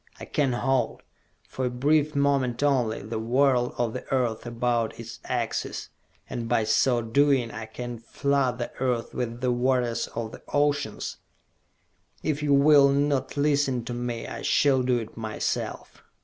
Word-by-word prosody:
I - - -7
can 140 -4 0
halt, 130 -1 0 0.4
for 130 - -3
a - - +1
brief 145 +4 +1
moment 140 -3 +1
only, 125 -8 +1
the 110 +1 -4
whirl 125 +1 +2
of 120 -2 0
the 125 - -5
earth 120 -3 0
about 120 -1 -1
its 115 -1 -8
axis. 120 -3 -3 0.4
And 115 -1 -5
by 120 -2 +2
so 120 +2 +2
doing 130 0 +2
I 110 0 -6
can 120 +1 -6
flood 135 +1 0
the 120 - -4
earth 125 -3 -1
with 120 -1 -3
the 125 -1 +2
waters 125 -1 +1
of 115 -1 -3
the - - -11
oceans! 145 0 0 1.1
If 150 -1 -1
you 150 -1 0
will 140 0 +6
not 140 0 0
listen 140 -4 +1
to 120 - -4
me, 120 -1 -3
I - - -6
shall 135 -3 +3
do 125 -1 +2
it 115 -2 -6
myself! 110 -1 -4
125 Hz, 160 wpm, -26 LUFS, 115-140 Hz, 1.1 s, will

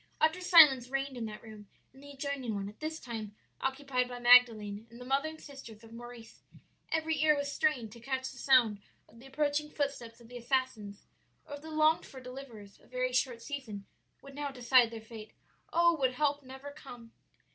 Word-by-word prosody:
"Utter 315 +4 +2
silence 300 -9 +7
reigned 270 0 -2
in 235 -2 -4
that 210 -1 -8
room 215 -2 -12 0.3
and 265 - -17
the 285 - -12
adjoining 275 -5 -4
one, 200 0 -3
at 210 - -12
this 315 +1 -4
time 220 -4 -7 0.2
occupied 265 -2 -1
by 245 - -6
Magdalen 230 -4 +5
and 235 +1 -14
the 250 - -9
mother 275 +4 +1
and 315 0 -11
sisters 235 -6 -12
of 225 0 -14
Maurice; 240 -1 -11 0.5
every 320 -2 0
ear 305 -1 +5
was 285 0 -3
strained 260 -8 0
to 235 - -12
catch 260 +1 -3
the - - -13
sound 240 -6 +4 0.3
of 230 - -18
the 265 - -13
approaching 295 +2 -1
footsteps 275 -6 -4
of 235 - -16
the 245 +1 -9
assassins, 235 -5 -2 0.4
or 295 - -10
of 285 - -7
the 320 - -10
longed 310 +1 +2
for 265 - -11
deliverers; 250 -6 -11
a - - -23
very 255 0 -2
short 250 -2 0
season 240 -9 -6 0.4
would 275 0 -12
now 290 0 -4
decide 250 -2 +4
their 225 -1 -8
fate. 220 -1 -11 0.4
Oh, 340 0 +4
would 260 -2 +2
help 290 +2 0
never 265 +1 -10
come! 245 -5 -12
255 Hz, 200 wpm, -31 LUFS, 230-285 Hz, 0.5 s, silence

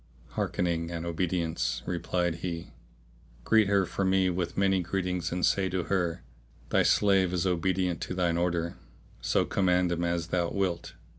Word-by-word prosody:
"Hearkening 85 -2 -1
and 85 -1 -4
obedience!' 85 -7 -1
replied 85 0 -1
he, 85 -1 -5 0.7
"greet 110 - +4
her 100 -1 +3
for 95 - -3
me 95 -1 +3
with 85 -1 -3
many 95 -1 +3
greetings 90 -1 -2
and 90 +1 +1
say 95 -1 +2
to 90 -1 -1
her, 90 -6 -1 0.5
Thy - - +3
slave 95 -3 +3
is 90 0 0
obedient 90 0 0
to 90 - -4
thine 90 -2 +1
order; 85 -1 -1 0.4
so - - +2
command 90 -2 +2
him 85 0 -1
as 85 -1 -1
thou 85 -1 +1
wilt." 95 -4 -2
90 Hz, 155 wpm, -29 LUFS, 85-95 Hz, 0.7 s, greet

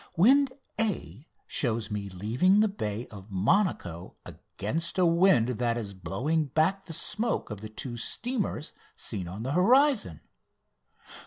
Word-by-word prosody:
"Wind 265 +9 +5 0.3
A" 165 - -2 0.2
shows 115 -4 -1
me 100 -1 -3
leaving 115 - +2
the 215 - +5
bay 115 - -4
of 100 -1 -11
Monaco 95 - 0
against 165 - -3
a 185 - +4
wind 170 -7 +4
that 120 -1 +1
is 105 -4 -5
blowing 125 - -1
back 160 +8 +1
the - - -9
smoke 215 - -1
of 105 -1 -6
the 110 - -7
two 120 +2 -6
steamers 210 - -2 0.2
seen 95 -6 -4
on 95 +6 -6
the 130 - -2
horizon. 210 - +3
130 Hz, 140 wpm, -28 LUFS, -, 0.3 s, Wind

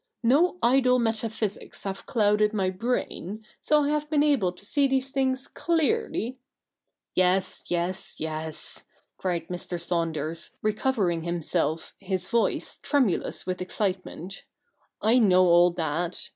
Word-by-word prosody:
No 300 +10 +3
idle 255 +1 +4
metaphysics 225 -3 -2
have 195 -1 -5
clouded 210 -2 +2
my 190 -3 0
brain, 215 -1 -3 0.2
so 300 -1 +3
I 285 - 0
have 300 0 -1
been 295 -2 +3
able 270 -12 +2
to 180 +3 -15
see 280 +5 +2
these 265 0 0
things 265 -1 -1
clearly 275 -6 -1 0.2
' - - -63
' - - -61
Yes, 185 +1 +1
yes, 175 +2 0
yes,' 155 0 0 0.3
cried 175 -3 -2
Mr. 180 -1 -4
Saunders, 165 -1 -2
recovering 210 -5 0
himself 165 -2 -2
his 185 -1 -3
voice 235 +1 0
tremulous 260 - 0
with 185 0 -3
excitement, 185 -1 -3 0.3
' - - -43
I 250 - +6
know 185 -5 +5
all 175 0 +6
that. 170 0 -3
195 Hz, 135 wpm, -26 LUFS, 175-250 Hz, 0.3 s, I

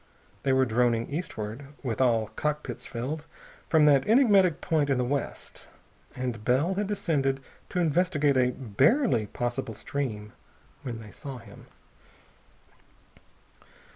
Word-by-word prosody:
They 135 - +1
were 130 0 +4
droning 120 -1 +1
eastward, 135 -6 -5 0.2
with 120 -2 -2
all 115 -4 +2
cockpits 150 0 -3
filled, 140 +6 -4 0.4
from 155 -2 +5
that 140 -3 +4
enigmatic 205 - +5
point 155 -5 +1
in 135 - +2
the 125 - +1
west. 140 +1 -4 0.5
And 125 -4 -4
Bell 135 - +2
had 200 +1 -1
descended 155 -10 0 0.3
to - - -5
investigate 160 -3 +2
a 125 -1 +4
barely 130 - +2
possible 120 0 -3
stream 105 -8 -4 0.5
when 120 -5 -6
they 105 -2 -11
saw 135 -2 -8
him. 115 - -14
135 Hz, 125 wpm, -27 LUFS, 120-155 Hz, 0.5 s, from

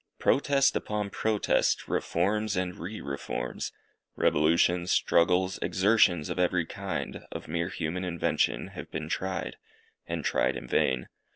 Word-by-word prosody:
Protest 140 0 +3
upon 105 -1 -2
protest! 110 -2 +1
reforms 105 0 0
and 90 -1 -1
re 95 +7 -6
reforms; 70 -1 -4 0.4
revolutions, 85 +3 +3
struggles, 90 +2 +3
exertions 95 -5 +3
of - - -3
every 90 -1 +2
kind, 100 +3 -5
of - - -7
mere 85 +2 -1
human 85 +1 -3
invention, 85 -3 0
have - - -9
been 75 0 -5
tried, 95 -1 -3 0.5
and - - -3
tried - - +1
in 60 0 -8
vain. 65 0 +1
90 Hz, 125 wpm, -28 LUFS, 85-100 Hz, 0.5 s, Protest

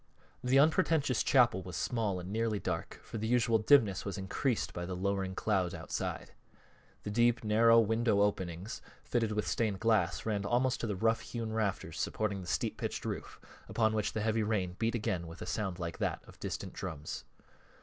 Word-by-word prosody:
The 125 +2 +3
unpretentious 155 -3 +3
chapel 120 -8 +4
was 90 -2 -8
small 105 -1 -1
and 90 +2 -7
nearly 110 0 0
dark, 85 -4 -4
for 115 - -6
the 110 - -2
usual 115 -1 +3
dimness 110 -4 +4
was 100 -1 -4
increased 105 +6 -1
by 85 - -4
the 90 - -3
lowering 95 0 -1
clouds 95 -5 0
outside. - - -4 0.7
The 105 - -4
deep, 120 +1 +3
narrow 115 +2 +6
window 110 -1 +2
openings, 95 -1 -2 0.2
fitted 115 -3 0
with 105 0 -1
stained 105 -4 0
glass, 115 0 +2
ran 105 -3 0
almost 125 +5 +1
to 115 - -1
the 105 - -1
rough 115 +4 +2
hewn 115 -2 -4
rafters 100 -6 -2
supporting 100 -3 -1
the 90 - -9
steep - - -1
pitched - - -4
roof, - - -5 0.3
upon 110 -1 +2
which 105 -1 0
the 110 - -1
heavy 110 +1 +1
rain 100 -5 -1
beat 115 +1 +1
again 90 -6 -2
with 85 +1 -10
a - - -5
sound 95 0 -2
like 85 -2 -5
that - - -1
of - - -15
distant - - -5
drums. 80 -5 -5
110 Hz, 185 wpm, -32 LUFS, 95-115 Hz, 0.7 s, narrow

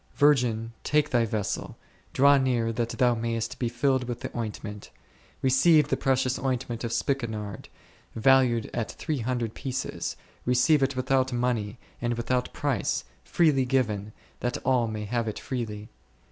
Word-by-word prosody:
Vir 145 +1 +6
gin, 115 -4 -2
take 150 0 +2
thy 120 -2 +3
vessel, 105 -2 -3 0.3
draw 140 +2 +6
near 125 -4 +1
that 115 0 -1
thou 125 0 +2
mayest 115 -1 -3
be 120 - 0
filled 130 +1 +1
with 120 -1 -5
the - - -6
ointment. 105 -2 -5 0.5
Receive 145 +3 +5
the - - +2
precious 130 -1 +1
oint 130 -1 -1
ment 120 -1 -5
of 115 - -2
spikenard, 115 -5 -2 0.5
valued 120 -1 +3
at 115 -2 -2
three 150 -3 -3
hundred 120 -1 -2
pieces, 130 -2 -4 0.3
receive 125 +5 +3
it 135 0 +1
without 130 0 +1
money 120 -3 -1 0.2
and 120 0 0
without 125 +2 -1
price, - - -1 0.2
freely 150 -6 +3
given, 110 -6 0 0.3
that 120 - -1
all 125 -3 +3
may 105 -1 -4
have 115 +2 -1
it 110 - -3
freely. 110 -5 -4
120 Hz, 155 wpm, -27 LUFS, 115-130 Hz, 0.5 s, Vir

